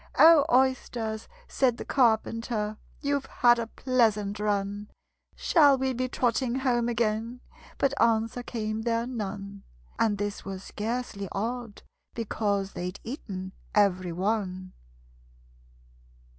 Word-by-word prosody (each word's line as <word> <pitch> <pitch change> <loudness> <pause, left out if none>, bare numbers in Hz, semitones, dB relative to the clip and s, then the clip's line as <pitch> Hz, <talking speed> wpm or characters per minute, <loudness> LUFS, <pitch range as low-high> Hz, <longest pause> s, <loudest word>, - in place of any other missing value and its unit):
"O, 320 -3 +8
Oysters," 245 -4 +1 0.2
said 250 -3 +1
the - - -6
Carpenter, 225 -3 +1 0.2
"You've 280 -1 -1
had 240 -1 +4
a 230 - -2
pleasant 220 -5 +1
run! 205 0 -1 0.5
Shall 290 -5 +5
we 265 0 0
be 255 +1 -2
trotting 245 0 0
home 245 -3 +1
again?" 230 +1 -1 0.4
But 275 0 +2
answer 230 +1 +2
came 220 -2 -3
there 230 0 0
none 200 -4 -5 0.4
And 215 -3 +2
this 205 0 -3
was 195 -1 -6
scarcely 220 -2 -4
odd, 230 +1 -4 0.3
because 205 -3 -1
They'd 180 +2 -5
eaten 195 -7 -6 0.2
every 185 -4 +3
one. 185 0 -2
225 Hz, 115 wpm, -28 LUFS, 205-245 Hz, 0.5 s, O